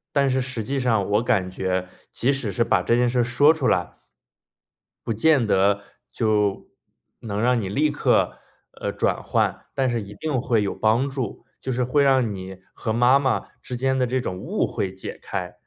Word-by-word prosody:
但 140 -1 +3
是 130 - +1
实 130 -3 -3
际 135 +5 -2
上 110 -6 +1
我 105 - +3
感 105 -7 0
觉， 95 0 -2 0.2
即 130 +4 +1
使 135 -6 -2
是 115 - +2
把 105 -5 +2
这 115 - +2
件 120 0 +3
事 125 +1 0
儿 120 - +4
说 145 +6 +4
出 150 -5 -1
来 85 -1 0 1.1
不 115 - +1
见 125 +1 +3
得 100 +1 +3 0.3
就 105 -3 0 0.5
能 105 -2 -3
让 125 -1 +2
你 95 - -4
立 150 +9 +2
刻， 145 - +1 0.3
呃， - - -4
转 - - -1
换， - - 0
但 135 -1 +1
是 120 -1 -1
一 100 0 -9
定 145 -6 -2
会 115 -4 +1
有 100 - -2
帮 115 +5 +2
助， 130 -5 -5 0.2
就 130 - -3
是 125 0 0
会 140 +3 +2
让 130 -5 +3
你 95 0 -8
和 110 - -3
妈 125 +4 +5
妈 130 -3 0
之 125 - -5
间 130 +1 +1
的 130 - +2
这 130 +2 0
种 90 -7 -4
误 - - -1
会 95 -1 -3
解 95 - -8
开。 90 -1 -4
120 Hz, 215 characters per minute, -23 LUFS, 100-130 Hz, 1.1 s, 妈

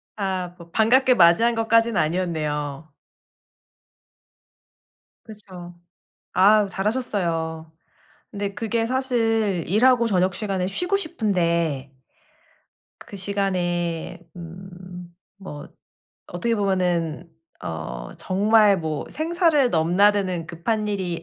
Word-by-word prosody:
아 185 -3 -3
뭐 170 -1 -14
반갑게 255 +4 +4
맞이한 180 +7 +5
것까진 225 0 +2
아니었네요. 155 -3 -2 2.3
그쵸. 185 -5 -11 0.6
아 205 +1 +5
잘하셨어요. 175 -7 -2 0.6
근데 200 -1 -4
그게 225 0 -1
사실 225 -8 0
일하고 235 +4 +3
저녁 185 -3 +1
시간에 195 -3 -2
쉬고 360 - 0
싶은데 170 - -1 1.1
그 200 - -11
시간에 175 -4 -2 0.2
음 180 0 -11 0.3
뭐 150 -7 -9 0.6
어떻게 230 +7 -1
보면은 180 -5 -1 0.3
어 60 -7 -6
정말 205 +1 +3
뭐 155 -3 -3
생사를 320 -4 +2
넘나드는 180 +1 +2
급한 210 +6 -2
일이 180 -5 -3
190 Hz, 200 characters per minute, -23 LUFS, 170-220 Hz, 2.3 s, 맞이한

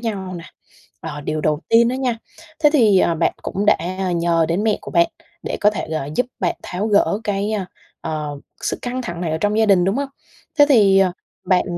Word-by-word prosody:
nhau 195 -5 -4
nè. 170 - -9 0.6
Ờ, 150 -2 -6
điều 155 +1 -3
đầu 150 0 +1
tiên 230 +1 +5
đó 250 - 0
nha, 255 -3 -1 0.5
thế 295 - +7
thì, 215 -9 +5
ờ, 170 - +2
bạn 165 - +1
cũng 200 +2 -3
đã, 210 - +6
à, 185 +1 -3
nhờ 170 -1 +2
đến 175 +5 0
mẹ 220 -2 +2
của - - -9
bạn, 170 -1 +4 0.4
để - - -3
có 210 - +6
thể, 200 -7 -5
gọi, 150 -2 -3
giúp 250 - +2
bạn 180 -3 0
tháo 195 +4 -3
gỡ 205 0 +2
cái, 205 0 -1
a, 205 -3 -2 0.4
ờ, 155 -2 -3 0.3
sự - - -2
căng 255 +1 -3
thẳng 175 -8 -6
này 165 -3 -2
ở 160 - 0
trong 205 +5 0
gia 220 - +4
đình, 195 -4 +4
đúng 195 +3 +1
hông? 280 0 -1 0.5
Thế 290 - +9
thì, 200 -7 +5
ờ, 190 -2 +3 0.3
bạn 185 -2 +3
195 Hz, 230 wpm, -20 LUFS, 170-215 Hz, 0.6 s, Thế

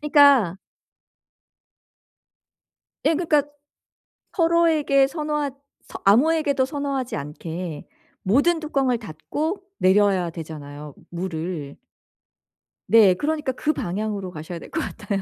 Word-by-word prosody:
그러니까 285 - +5 2.5
예. 320 - +4
그러니까 305 -4 +2 0.9
서로에게 330 -5 +3
선호하 300 -1 -2 0.4
서 - - -8
아무에게도 280 +5 +4
선호하지 275 -2 -3
않게 160 +2 -6 0.4
모든 285 - +3
뚜껑을 275 -5 0
닫고 290 - -4 0.2
내려야 190 -2 +3
되잖아요 150 -3 -8 0.2
물을. 170 -4 -5 1.1
네. 215 -5 +6
그러니까 300 - -1
그 305 +4 0
방향으로 200 - -3
가셔야 165 +1 -7
될 - - -12
것 320 - -2
같아요. 205 -6 -3
230 Hz, 245 characters per minute, -23 LUFS, -, 2.5 s, 네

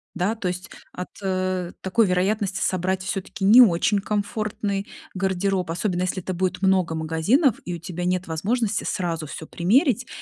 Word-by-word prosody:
да, 185 +4 0
то 210 -4 -4
есть 180 +1 -4 0.2
от, 180 - -6
э, 185 -2 -1
такой 205 +3 +2
вероятности 195 +2 0
собрать 185 +1 0
всё-таки 195 0 -3
не 225 +6 +9
очень 205 -1 +4
комфортный 205 -1 -2 0.3
гардероб, 190 -1 -1
особенно 175 +2 -1
если 185 0 -2
это 185 - -3
будет 185 +1 -1
много 185 -4 +2
магазинов 165 - +2
и 175 - -3
у - - -5
тебя 175 +1 -5
нет 180 0 0
возможности 205 +6 -1
сразу 165 -4 -2
всё 160 - -7
примерить. 240 - +2
185 Hz, 160 wpm, -24 LUFS, 180-205 Hz, 0.3 s, не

